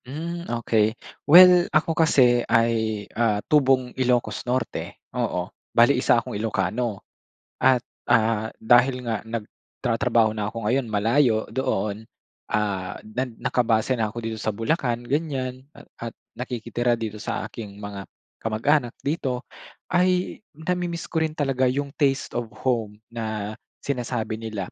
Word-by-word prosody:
Hmm, 170 Hz, +6 st, -5 dB
okey. 110 Hz, -2 st, +1 dB, 0.3 s
Well, 180 Hz, +2 st, +9 dB
ako 155 Hz, +1 st, +2 dB
kasi 130 Hz, -6 st, +4 dB
ay, 110 Hz, -2 st, +1 dB
ah, 110 Hz, -2 st, +2 dB
tubong 135 Hz, -4 st, +3 dB
Ilocos 120 Hz, -5 st, 0 dB
Norte, 130 Hz, +1 st, -2 dB, 0.2 s
oo. -, -, -2 dB, 0.2 s
Bale, -, -, +5 dB
1 -, -, +3 dB
akong -, -, -3 dB
Ilocano. 105 Hz, +1 st, -2 dB, 0.5 s
At 130 Hz, -2 st, +4 dB, 0.2 s
ah, 110 Hz, -2 st, +3 dB
dahil 125 Hz, +3 st, +3 dB
nga 115 Hz, -3 st, -1 dB
nagtratrabaho 115 Hz, +1 st, -1 dB
na 105 Hz, -1 st, -3 dB
ako 115 Hz, +1 st, -5 dB
ngayon, 120 Hz, +4 st, +1 dB
malayo 110 Hz, +2 st, +2 dB
doon, 110 Hz, -3 st, -2 dB, 0.4 s
ah, 100 Hz, -2 st, -1 dB
nan 120 Hz, +2 st, -4 dB
nakabase 120 Hz, +1 st, +1 dB
na 110 Hz, -, +2 dB
ako 115 Hz, +2 st, -7 dB
dito 110 Hz, -1 st, -4 dB
sa 105 Hz, -1 st, -2 dB
Bulacan, 120 Hz, 0 st, -1 dB
ganyan. 130 Hz, -2 st, -2 dB
A -, -, -13 dB, 0.2 s
at 115 Hz, -, -8 dB, 0.2 s
nakikitira 120 Hz, -1 st, -1 dB
dito 110 Hz, -2 st, -5 dB
sa -, -, -3 dB
aking 105 Hz, -2 st, -8 dB
mga 100 Hz, -1 st, -7 dB, 0.3 s
kamag-anak 120 Hz, +4 st, +1 dB
dito, 135 Hz, -4 st, -2 dB, 0.5 s
ay 180 Hz, 0 st, +2 dB, 0.2 s
namimiss 170 Hz, +1 st, -3 dB
ko 165 Hz, -, +1 dB
rin 160 Hz, -1 st, -1 dB
talaga 135 Hz, -3 st, +1 dB
yung 140 Hz, +2 st, -1 dB
taste 140 Hz, -2 st, +1 dB
of 120 Hz, -1 st, -3 dB, 0.2 s
home 115 Hz, -5 st, 0 dB, 0.2 s
na 110 Hz, -2 st, -4 dB, 0.3 s
sinasabi 120 Hz, -4 st, -2 dB
nila. 110 Hz, -4 st, -5 dB
120 Hz, 135 wpm, -24 LUFS, 110-135 Hz, 0.5 s, Well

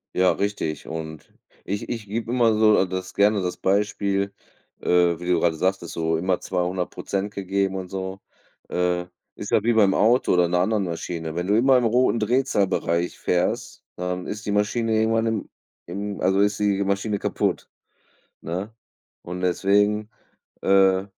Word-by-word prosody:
Ja, 90 Hz, 0 st, +4 dB
richtig 100 Hz, -6 st, -3 dB
und 80 Hz, -1 st, -7 dB, 0.3 s
ich 100 Hz, +1 st, -4 dB
ich 115 Hz, -3 st, -4 dB
gebe 115 Hz, +3 st, -3 dB
immer 120 Hz, -3 st, +3 dB
so 110 Hz, -2 st, +4 dB
das 95 Hz, 0 st, -5 dB
gerne 100 Hz, 0 st, +3 dB
das 90 Hz, -1 st, -3 dB
Beispiel, 100 Hz, 0 st, 0 dB, 0.5 s
äh, -, -, -9 dB, 0.3 s
wie 90 Hz, -, -7 dB
du 90 Hz, -2 st, +3 dB
gerade 80 Hz, -1 st, +1 dB
sagtest, 95 Hz, +2 st, 0 dB
ist 85 Hz, -, -7 dB
so 80 Hz, 0 st, 0 dB
immer 90 Hz, +2 st, 0 dB
200% 95 Hz, +3 st, -3 dB
gegeben 95 Hz, 0 st, -1 dB
und 95 Hz, -1 st, -5 dB
so. 95 Hz, 0 st, -5 dB, 0.5 s
Äh, 90 Hz, 0 st, 0 dB, 0.3 s
ist 105 Hz, -, -7 dB
ja -, -, +4 dB
wie 120 Hz, +1 st, +3 dB
beim 100 Hz, -3 st, +4 dB
Auto 120 Hz, 0 st, +3 dB
oder 90 Hz, -1 st, +4 dB
in 85 Hz, -, -3 dB
'ner 90 Hz, -, +2 dB
anderen 105 Hz, 0 st, +1 dB
Maschine. 80 Hz, -1 st, -5 dB
Wenn 90 Hz, +1 st, -2 dB
du 105 Hz, +2 st, +3 dB
immer 130 Hz, +2 st, +5 dB
im 125 Hz, -, +1 dB
roten 120 Hz, 0 st, +2 dB
Drehzahlbereich 100 Hz, -7 st, 0 dB
fährst, 90 Hz, 0 st, -1 dB
dann 90 Hz, 0 st, -3 dB
ist 105 Hz, +1 st, -6 dB
die 105 Hz, -, -1 dB
Maschine 110 Hz, +2 st, +1 dB
irgendwann 115 Hz, +1 st, +2 dB
im 110 Hz, -2 st, -2 dB, 0.4 s
im 100 Hz, +3 st, -5 dB
also 95 Hz, +1 st, +2 dB
ist 100 Hz, +1 st, +2 dB
die 100 Hz, -1 st, +1 dB
Maschine 100 Hz, +1 st, -1 dB
kaputt, -, -, -1 dB, 0.7 s
ne? 95 Hz, +7 st, -5 dB, 0.5 s
Und 90 Hz, +1 st, -6 dB
deswegen, 105 Hz, +3 st, +2 dB, 0.5 s
äh, 95 Hz, -1 st, +4 dB
100 Hz, 165 wpm, -24 LUFS, 90-105 Hz, 0.7 s, immer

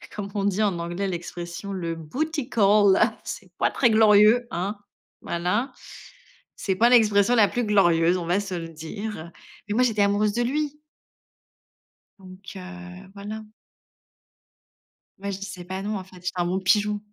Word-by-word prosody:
comment 200 Hz, -1 st, -5 dB
on 200 Hz, -1 st, 0 dB
dit 205 Hz, +1 st, +1 dB
en 190 Hz, -5 st, 0 dB
anglais 175 Hz, +4 st, -3 dB
l'expression? 175 Hz, +1 st, -6 dB
Le 170 Hz, -3 st, -3 dB
bootycall, 210 Hz, -, +2 dB, 0.2 s
c'est -, -, -7 dB
pas -, -, +2 dB
très 240 Hz, -, +3 dB
glorieux, 220 Hz, +2 st, +5 dB
hein. 190 Hz, +5 st, -2 dB, 0.5 s
Voilà, 180 Hz, +10 st, -1 dB, 0.8 s
c'est 190 Hz, -, -2 dB
pas 235 Hz, +5 st, +4 dB
l'expression 220 Hz, -1 st, +4 dB
la 210 Hz, -3 st, +5 dB
plus 245 Hz, +1 st, -2 dB
glorieuse, 175 Hz, -4 st, +3 dB
on 175 Hz, -, -4 dB
va 180 Hz, +3 st, +2 dB
se 200 Hz, -2 st, -4 dB
le 165 Hz, -1 st, -5 dB
dire, 200 Hz, +7 st, -6 dB
heu, 170 Hz, -, -15 dB, 0.4 s
mais 205 Hz, -, 0 dB
moi, 250 Hz, -, +4 dB
j'étais 220 Hz, -4 st, +1 dB
amoureuse 205 Hz, +1 st, +2 dB
de 240 Hz, +2 st, 0 dB
lui 295 Hz, +3 st, -2 dB, 1.4 s
donc, 185 Hz, +1 st, -12 dB
heu, 180 Hz, 0 st, -10 dB
voilà. 215 Hz, +2 st, -7 dB, 1.8 s
Moi, 200 Hz, 0 st, -4 dB
je 190 Hz, -, -5 dB
disais 195 Hz, -2 st, -7 dB
pas 190 Hz, +1 st, -5 dB
non, 210 Hz, +1 st, -3 dB
en 190 Hz, -, -6 dB
fait, 185 Hz, 0 st, -16 dB
j'étais 180 Hz, +1 st, -4 dB
un 175 Hz, -1 st, 0 dB
bon 185 Hz, +2 st, -1 dB
pigeon, 205 Hz, +2 st, +2 dB
200 Hz, 160 wpm, -24 LUFS, 180-215 Hz, 1.8 s, glorieux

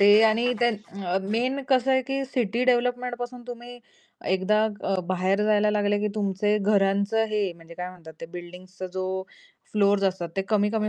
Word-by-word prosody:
ते 200 Hz, -, +6 dB, 0.2 s
आणि 225 Hz, +2 st, +1 dB, 0.2 s
त्या 200 Hz, -5 st, -1 dB, 0.2 s
मेन 255 Hz, +4 st, 0 dB
कसं 260 Hz, -1 st, +3 dB
आहे 260 Hz, 0 st, +4 dB
की 270 Hz, 0 st, -1 dB
सिटी 240 Hz, -1 st, 0 dB
डेव्हलपमेंट 245 Hz, 0 st, +1 dB
पासून 245 Hz, 0 st, -6 dB
तुम्ही 245 Hz, 0 st, -9 dB, 0.5 s
एकदा 200 Hz, +3 st, +2 dB, 0.2 s
अ, 195 Hz, -, +1 dB
बाहेर 185 Hz, +2 st, +1 dB
जायला 210 Hz, 0 st, +3 dB
लागले 205 Hz, 0 st, +1 dB
की 210 Hz, +1 st, 0 dB
तुमचे 205 Hz, 0 st, +1 dB
घरांचं 200 Hz, +2 st, +2 dB
हे 210 Hz, -, +2 dB
म्हणजे 170 Hz, 0 st, -14 dB
काय 180 Hz, +1 st, -5 dB
म्हणतात 170 Hz, -3 st, -13 dB
ते -, -, -6 dB
बिल्डींग्सचा 180 Hz, +2 st, -8 dB
जो 185 Hz, 0 st, -2 dB, 0.7 s
फ्लोअर्स 200 Hz, -1 st, +3 dB
असतात 185 Hz, -3 st, 0 dB
ते 195 Hz, -, +1 dB
कमी-कमी 215 Hz, 0 st, +1 dB
210 Hz, 165 wpm, -26 LUFS, 190-240 Hz, 0.7 s, ते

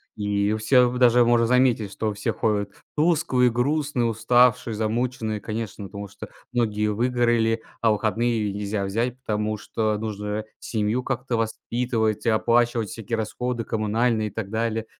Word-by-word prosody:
И 105 Hz, 0 st, 0 dB
у 110 Hz, -, -1 dB
всех 125 Hz, +2 st, +3 dB
даже 120 Hz, -1 st, +5 dB
можно 120 Hz, -1 st, +4 dB
заметить, 125 Hz, -5 st, +2 dB
что 110 Hz, 0 st, -2 dB
все 100 Hz, -, -2 dB
ходят 100 Hz, -2 st, -1 dB, 0.2 s
тусклые, 150 Hz, -6 st, +3 dB
грустные, 140 Hz, +1 st, 0 dB
уставшие, 120 Hz, +1 st, +3 dB
замученные, 110 Hz, 0 st, -2 dB
конечно, 110 Hz, -1 st, -5 dB
потому 100 Hz, +1 st, -7 dB
что 100 Hz, -, -10 dB, 0.2 s
многие 105 Hz, -3 st, +1 dB
выгорали. 115 Hz, 0 st, +1 dB, 0.2 s
А 115 Hz, -, +4 dB
выходные 110 Hz, 0 st, 0 dB
нельзя 100 Hz, 0 st, -2 dB
взять, 120 Hz, +6 st, -2 dB
потому 105 Hz, -2 st, -2 dB
что 110 Hz, 0 st, -1 dB
нужно 105 Hz, 0 st, -4 dB
семью 110 Hz, +3 st, -1 dB
как-то 125 Hz, -1 st, -2 dB
воспитывать 115 Hz, 0 st, -1 dB
и -, -, +3 dB
оплачивать 115 Hz, 0 st, +2 dB
всякие 115 Hz, +2 st, -4 dB
расходы 120 Hz, +2 st, -3 dB
коммунальные 110 Hz, 0 st, 0 dB
и -, -, -17 dB
так 105 Hz, -3 st, -5 dB
далее. 115 Hz, 0 st, -1 dB
115 Hz, 145 wpm, -24 LUFS, 105-120 Hz, 0.2 s, даже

